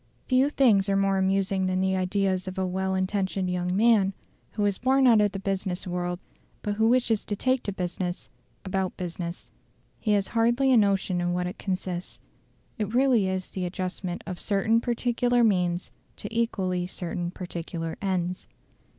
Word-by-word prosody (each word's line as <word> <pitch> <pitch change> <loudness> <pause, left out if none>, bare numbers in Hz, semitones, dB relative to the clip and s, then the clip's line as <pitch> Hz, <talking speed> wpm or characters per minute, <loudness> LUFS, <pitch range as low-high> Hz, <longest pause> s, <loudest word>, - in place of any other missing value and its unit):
Few 260 +2 +3
things 215 -9 +3
are 195 - +2
more 195 0 +2
amusing 190 0 +1
than 185 0 0
the 190 0 +1
ideas 185 0 0
of 185 +1 -6
a 190 - 0
well 190 +1 -1
intentioned 190 -1 -1
young 180 0 -1
man, 210 -2 +4 0.4
who 210 -1 0
is 200 -2 0
born 265 +2 +3
out 230 -4 +6
of 205 -1 +2
the 195 - -5
business 190 -2 -2
world, 175 -1 -2 0.5
but 205 - -1
who 220 +2 +2
wishes 235 -3 +2
to 205 - -2
take 255 +4 +1
to 200 - -3
business, 180 -1 -4 0.4
about 190 -1 -2
business. 175 -1 -5 0.5
He 215 - +1
has 200 -1 +1
hardly 240 +4 +2
a - - +6
notion 195 -3 +2
in 175 0 0
what 180 0 -1
it 180 +3 -6
consists. 185 -2 -4 0.6
It 215 +2 -2
really 250 -6 +4
is 185 0 -3
the 185 -1 -3
adjustment 185 0 -4
of 185 -3 -5
certain 220 +3 +2
particular 240 0 +1
means 180 -4 +1 0.2
to - - -7
equally 185 -6 0
certain 175 -1 -4
particular 170 -2 -5
ends. 185 -2 -2
190 Hz, 170 wpm, -26 LUFS, 180-215 Hz, 0.6 s, out